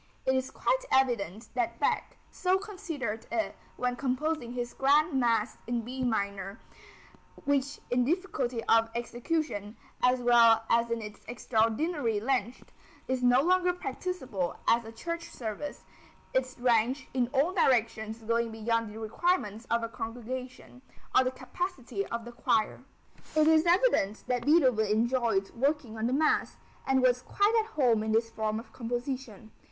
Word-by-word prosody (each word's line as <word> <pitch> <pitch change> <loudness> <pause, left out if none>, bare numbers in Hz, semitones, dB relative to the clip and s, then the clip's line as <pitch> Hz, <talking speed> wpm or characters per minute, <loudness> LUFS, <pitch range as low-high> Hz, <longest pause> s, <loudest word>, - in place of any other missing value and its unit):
It 260 - +3
is 260 0 0
quite - - 0
evident 230 -5 +1
that 235 -1 -1
Bach - - 0
so 370 +1 +1
considered 320 - -5
it 335 -2 -1 0.2
when 250 0 0
composing 260 0 -1
his 245 -1 -4
grand 295 +4 +3
mass 235 -4 +1
in 240 0 -1
B 255 +3 -4
minor, 200 -3 -2 0.9
which 280 0 0
in 245 0 +3
difficulty 265 -7 -1
of 225 0 +4
execution, 240 -3 -3 0.2
as 250 0 +4
well 235 -2 +5
as 235 0 +3
in 230 -1 -2
its 210 0 -10
extraordinary 230 +2 0
length, 245 0 -2 0.4
is 260 -1 -1
no 250 +1 +5
longer 360 +1 +3
practicable 260 - -3
as 235 0 +4
a 225 - -8
church 335 +8 -5
service, 235 +5 -6 0.5
its 255 -1 0
range 245 +2 +2
in 250 -2 +1
all 280 +7 +1
directions 225 - +1
going 230 +1 0
beyond 225 0 -1
the 210 - -10
requirements 225 - -1
of 235 0 +1
a - - -1
congregation, 250 +3 -7 0.3
or 260 - +7
the - - +2
capacity 255 - -4
of 235 0 -4
the 240 - -8
choir. 225 0 0 0.5
It 310 0 +5
is 320 +1 +5
evident 345 - +3
that 250 0 -2
Beethoven 260 -9 +4
enjoyed 225 -2 +1
working 265 -2 -1
on 220 +1 -1
the - - -1
Mass, 305 +3 +1 0.3
and 265 -1 +3
was 250 -1 +3
quite 405 - +1
at 445 +1 -14
home 240 -7 +3
in 220 0 -1
this 225 +1 +1
form 220 -1 -2
of 230 - -13
composition. 240 -2 -5
245 Hz, 150 wpm, -29 LUFS, 225-275 Hz, 0.9 s, or